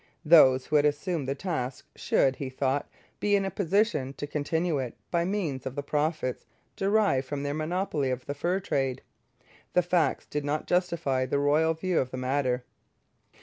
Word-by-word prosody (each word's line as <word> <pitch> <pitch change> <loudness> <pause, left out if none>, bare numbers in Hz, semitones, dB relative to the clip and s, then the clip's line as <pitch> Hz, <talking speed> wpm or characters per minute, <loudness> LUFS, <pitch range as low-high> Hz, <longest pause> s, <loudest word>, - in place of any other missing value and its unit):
Those 130 -5 +7
who 150 - +2
had 145 - +3
assumed 150 0 -1
the 135 - -1
task 135 -6 -4
should, 135 -1 +2
he 135 - -4
thought, 135 +2 -1 0.3
be 205 0 +2
in 195 -1 +1
a 195 - -2
position 175 - +1
to 145 - -5
continue 155 +2 -1
it 125 -3 -4 0.2
by 170 -1 +1
means 170 -10 -2
of 130 - -6
the 145 - -3
profits 150 -3 -1 0.3
derived 195 -10 +2
from 145 +1 -3
their 145 0 -2
monopoly 155 -2 -1
of 130 0 -3
the 140 - -3
fur 175 +6 0
trade. 135 -8 -1 0.7
The 180 - +4
facts 175 -1 +1
did 150 0 -3
not 145 +2 -2
justify 165 -8 0
the 140 - 0
royal 150 +3 +3
view 180 +1 0
of 130 - -1
the 130 - -6
matter. 130 -1 0
145 Hz, 180 wpm, -28 LUFS, 135-175 Hz, 0.7 s, Those